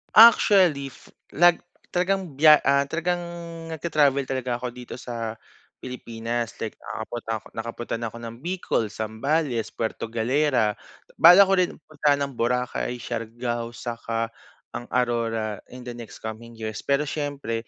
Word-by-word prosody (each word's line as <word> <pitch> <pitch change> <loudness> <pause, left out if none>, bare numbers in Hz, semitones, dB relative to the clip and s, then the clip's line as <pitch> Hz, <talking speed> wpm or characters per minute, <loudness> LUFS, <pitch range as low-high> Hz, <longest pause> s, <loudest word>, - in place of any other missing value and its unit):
Actually, 190 -11 +7
f - - -18 0.2
nag 175 +2 +4 0.2
talagang 180 -3 -1
biya 150 +1 +8
ah, 140 0 +5
talagang 170 +4 -1 0.5
nagta-travel 145 -4 +1
talaga 130 -2 -2
ako 125 - -3
dito 125 -1 -8
sa 115 -3 -5 0.4
Pilipinas, 120 -2 -4
like 110 - -4
nakakapunta 115 +1 -5
ako - - -16
nakapunta 115 +1 -4
na 115 0 -4
ako 115 - -10
ng 115 - -8
Bicol, 175 - -1
Zambales, 115 +4 -1
Puerto 115 0 -4
Galera. 120 -2 +2 0.4
Balak 180 +4 +9
ko 195 - +3
rin 180 -1 +2 0.2
puntahan 145 -1 +2
ang 135 - -12
Boracay, 125 +1 -1
Siargao 120 0 -4
saka 115 -1 -3 0.4
ang 120 - -6
Aurora 115 -4 0
in 125 0 -11
the 125 - -6
next 120 -2 -10
coming 115 +1 -7
years. 110 -1 -5
Pero 140 +1 +1
syempre 140 -6 -3
125 Hz, 140 wpm, -25 LUFS, 115-150 Hz, 0.5 s, Balak